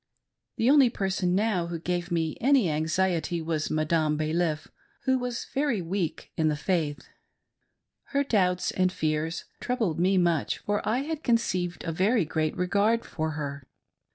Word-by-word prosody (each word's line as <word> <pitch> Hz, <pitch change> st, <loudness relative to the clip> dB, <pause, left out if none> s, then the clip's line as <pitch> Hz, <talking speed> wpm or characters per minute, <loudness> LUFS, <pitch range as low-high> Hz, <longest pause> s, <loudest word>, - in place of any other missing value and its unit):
The 225 Hz, -, +1 dB
only 275 Hz, -2 st, +6 dB
person, 190 Hz, -4 st, 0 dB
now, 195 Hz, -4 st, +1 dB
who 170 Hz, 0 st, -4 dB
gave 175 Hz, +1 st, -2 dB
me 165 Hz, -3 st, 0 dB
any 260 Hz, -, +4 dB
anxiety 170 Hz, +2 st, 0 dB
was 160 Hz, -1 st, -2 dB
Madarpe 155 Hz, 0 st, +1 dB
Balif, 155 Hz, 0 st, -1 dB, 0.4 s
who 260 Hz, -1 st, +2 dB
was 245 Hz, -1 st, -3 dB
very 275 Hz, -6 st, +1 dB
weak 175 Hz, -1 st, -3 dB
in 160 Hz, -, +1 dB
the 155 Hz, -, +1 dB
faith. 150 Hz, -2 st, -1 dB, 1.0 s
Her 280 Hz, 0 st, 0 dB
doubts 185 Hz, -8 st, +1 dB
and 185 Hz, -1 st, +1 dB
fears 155 Hz, 0 st, -2 dB
troubled 225 Hz, -11 st, -1 dB
me 190 Hz, +2 st, +3 dB
much, 170 Hz, -4 st, +1 dB
for 205 Hz, 0 st, -1 dB
I 245 Hz, +4 st, +1 dB
had 315 Hz, 0 st, -4 dB
conceived 185 Hz, -7 st, 0 dB
a 165 Hz, -, -2 dB
very 190 Hz, +4 st, +2 dB
great 155 Hz, 0 st, -1 dB
regard 200 Hz, +6 st, +2 dB
for 160 Hz, -1 st, -3 dB
her. 140 Hz, -3 st, -5 dB
175 Hz, 155 wpm, -27 LUFS, 160-215 Hz, 1.0 s, only